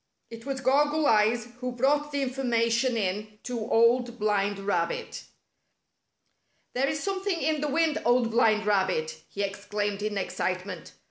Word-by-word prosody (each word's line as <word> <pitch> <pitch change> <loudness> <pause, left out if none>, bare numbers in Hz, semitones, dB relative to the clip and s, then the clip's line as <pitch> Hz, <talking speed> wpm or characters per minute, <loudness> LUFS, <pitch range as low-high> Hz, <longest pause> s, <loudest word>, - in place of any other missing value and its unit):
It 230 +2 -10
was 270 -1 -3
Goggle 295 +4 +2
Eyes 225 +1 +3
who 250 0 -3
brought 290 +4 +1
the 280 -1 -1
information 245 -2 +1
in 210 +1 -3
to 245 -1 -4
Old 240 +1 +3
Blind 205 -2 0
Rabbit. 180 -4 -2 1.5
"There 260 +2 +1
is 300 +2 -2
something 390 -2 -1
in 310 -2 0
the 300 - 0
wind. 315 +2 +1
Old 240 -1 +3
Blind 220 -2 +3
Rabbit! 185 -6 0
" - - -39
he 200 - -3
exclaimed 205 0 -3
in 210 -1 -2
excitement. 185 0 -3
230 Hz, 145 wpm, -27 LUFS, 205-270 Hz, 1.5 s, Eyes